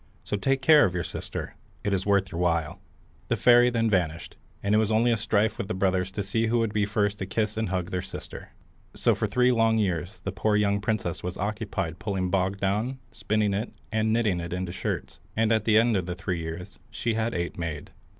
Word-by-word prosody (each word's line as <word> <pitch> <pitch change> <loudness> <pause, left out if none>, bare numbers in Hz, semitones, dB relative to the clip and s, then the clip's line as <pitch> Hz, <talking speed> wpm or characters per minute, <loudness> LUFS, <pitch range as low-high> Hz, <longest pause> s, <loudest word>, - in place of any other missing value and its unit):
So - - -2
take 135 +6 0
care 150 0 +7
of 90 - +1
your 90 - -1
sister; - - -6 0.3
it 100 - 0
is 95 +1 -1
worth 100 -1 +2
your 85 - -3
while." 85 -3 0 0.5
The - - +1
fairy 120 0 +6
then 115 -2 +1
vanished, 85 -6 -1 0.3
and 100 +1 +1
it 105 - +5
was 110 0 +1
only 115 +2 +3
a - - +4
strife 110 0 +1
with 100 - -3
the 110 - -3
brothers 95 -1 +1
to 100 - -2
see 110 +3 0
who 120 +2 +2
would 115 -2 0
be 105 -1 +1
first 105 -1 0
to 95 - -3
kiss 105 +2 -1
and 110 -2 -1
hug 90 -1 -2
their 90 - -1
sister. - - -9 0.5
So - - +3
for - - -1
three 125 0 +3
long 115 -2 +3
years 95 -1 -1
the 100 - -2
poor 105 +2 +1
young 100 -1 +2
princess 105 -5 -2
was 90 0 -5
occupied 100 -4 -3
pulling 95 -4 -2
bog 95 +1 +1
down, 105 +7 -1
spinning 105 -1 0
it, 105 +4 -3 0.2
and 110 0 +1
knitting 110 -6 +2
it 85 0 -5
into 90 -1 -3
shirts, 95 - -4 0.2
and 110 0 +3
at 110 -2 +2
the 110 -1 +5
end 115 0 +4
of 95 -2 -1
the 90 - -3
three 90 -1 -3
years 85 +4 -7
she 115 - -2
had 115 +1 -1
eight 85 0 -3
made. 80 -3 -4
100 Hz, 225 wpm, -26 LUFS, 90-110 Hz, 0.5 s, care